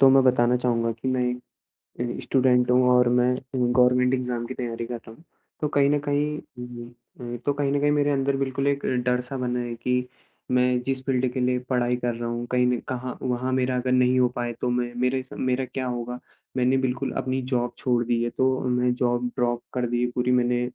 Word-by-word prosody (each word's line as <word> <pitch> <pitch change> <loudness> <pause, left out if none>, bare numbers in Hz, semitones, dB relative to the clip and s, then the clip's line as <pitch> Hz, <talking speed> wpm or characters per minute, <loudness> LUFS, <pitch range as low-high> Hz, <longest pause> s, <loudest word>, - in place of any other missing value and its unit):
तो 135 - +8
मैं 135 0 +6
बताना 125 -1 +4
चाहूँगा 115 -2 0
कि 115 +4 -5
मैं 130 -1 +1
एक 125 0 -3 0.8
अ, - - -6
स्टूडेंट 125 -2 +3
हूँ 125 0 +4
और 125 0 +5
मैं 125 +1 +3
अ, - - -5 0.2
गवर्नमेंट 125 0 +3
एग्ज़ाम 125 -2 -1
की 130 - -5
तैयारी 120 -2 -4
कर 120 - -6
रहा 115 -1 -11
हूँ। 160 - -19 0.4
तो 150 - +1
कहीं 140 -1 +4
न 145 0 +2
कहीं 145 +1 +2
हुँ, 125 -1 -10
हुँ, 120 0 -10 0.3
हुँ, 120 0 -4
तो 145 - +2
कहीं 140 -1 0
न 145 - +1
कहीं 145 0 +3
मेरे 145 0 +2
अंदर 135 0 +1
बिल्कुल 135 0 -1
एक 140 0 0 0.2
डर-सा 125 +2 -1
बना 125 -1 -1
है 120 -1 -3
कि 125 0 0 0.4
मैं 125 0 +3
जिस 130 0 -2
फ़ील्ड 130 -1 +1
के - - -2
लिए 125 0 +1
पढ़ाई 125 -1 +1
कर 120 -1 -1
रहा 120 0 -4
हूँ, 120 0 -3
कहीं 125 0 +3
ने 125 -1 +2
कहाँ 125 0 -4
वहाँ 125 0 -1
मेरा 130 0 +1
अगर 125 0 -1
नहीं 125 0 +4
हो 125 - +5
पाए 120 -1 -2
तो 125 - 0
मैं 120 0 -1
मेरे 130 +1 +1
सा 130 - -12
मेरा 130 0 0
क्या 130 +1 -4
होगा। 125 0 -4 0.4
मैंने 130 +1 +3
बिल्कुल 130 -1 -1
अपनी 130 0 -1
जॉब 125 -2 -1
छोड़ 120 -2 +1
दी 120 0 +1
है। 120 - 0
तो 130 +2 +1
मैं 125 0 +2
जॉब 120 -1 0
ड्रॉप 120 -1 0
कर 125 -1 0
दी 120 0 0
है 125 - +2
पूरी 125 0 +1
मैंने 125 -1 +2
125 Hz, 230 wpm, -25 LUFS, 120-130 Hz, 0.8 s, तो